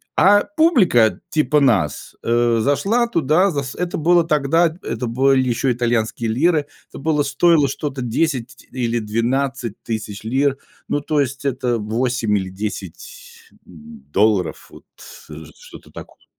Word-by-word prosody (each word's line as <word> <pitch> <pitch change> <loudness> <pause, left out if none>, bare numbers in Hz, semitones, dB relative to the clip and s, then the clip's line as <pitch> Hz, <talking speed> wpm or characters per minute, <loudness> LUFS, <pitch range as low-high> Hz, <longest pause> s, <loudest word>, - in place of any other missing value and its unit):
А 205 +2 +5
публика 235 - +3
типа 150 -1 +2
нас, 105 - 0
э, 120 0 +2
зашла 200 - +1
туда, 170 - +2
за 140 -3 -2
с 135 - -7
это 180 -1 -3
было 170 +2 +3
тогда, 160 +2 +2
эт 165 +3 -10
это 125 - -4
были 130 +2 +2
еще 120 +2 0
итальянские 115 -1 -1
лиры, 150 +5 +1 0.2
это - - -11
было 150 0 0
стоило 145 +1 +3
что-то 140 0 -4
10 125 0 -2
или 120 -2 -1
12 120 +2 -2
тысяч 105 -2 -5
лир, 135 +4 0 0.3
ну, 145 - -1
то 150 +1 -1
есть, 140 +1 -4
это 125 -3 -1
8 110 0 -1
или 95 -1 -4
10 95 -3 -8 0.2
м 75 -4 -14
долларов, 100 -5 +1
вот, - - -16 0.4
э, 80 +1 -9
что-то - - -15
такое. - - -13
130 Hz, 145 wpm, -20 LUFS, 115-150 Hz, 0.4 s, А